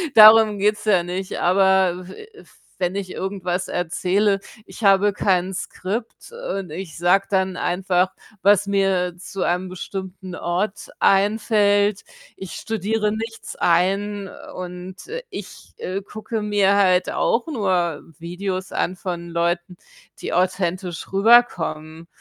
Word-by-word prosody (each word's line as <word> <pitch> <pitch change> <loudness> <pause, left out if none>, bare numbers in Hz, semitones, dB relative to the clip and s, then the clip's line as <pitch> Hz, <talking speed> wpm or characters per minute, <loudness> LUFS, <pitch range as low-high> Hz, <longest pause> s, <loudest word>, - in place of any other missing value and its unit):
Darum 215 -1 +8
geht's 210 +1 +1
ja 190 -5 +3
nicht, 185 +2 -4
aber 185 0 +3
w 430 - -11 0.5
wenn 180 -1 0
ich 195 -2 -4
irgendwas 185 -2 -3
erzähle, 190 +4 +1 0.3
ich - - -11
habe 200 +1 +5
kein 190 -2 +1
Skript 195 - -5
und 195 - -5
ich 165 +1 -7
sage 180 +3 +3
dann 190 -2 0
einfach, 180 0 +1 0.3
was 200 0 +4
mir 190 -3 +1
zu 185 +1 -7
einem 180 +2 0
bestimmten 185 0 -7
Ort 190 +5 -2
einfällt. 205 0 +3 0.3
Ich 190 -2 -8
studiere 215 0 -1
nichts 225 +1 -6
ein 195 +3 +1 0.3
und, 180 +2 -8
äh, 475 +4 -5
ich, - - -9
äh, 190 +2 -4
gucke 215 +2 -5
mir 205 -1 +3
halt 185 -2 +3
auch 235 +5 +1
nur 185 - 0 0.2
Videos 185 +2 -4
an 185 - -1
von 175 -2 -5
Leuten, 170 +1 -1 0.4
die - - -4
authentisch 180 -1 -1
rüberkommen. 170 -7 +2
190 Hz, 125 wpm, -22 LUFS, 180-205 Hz, 0.5 s, Darum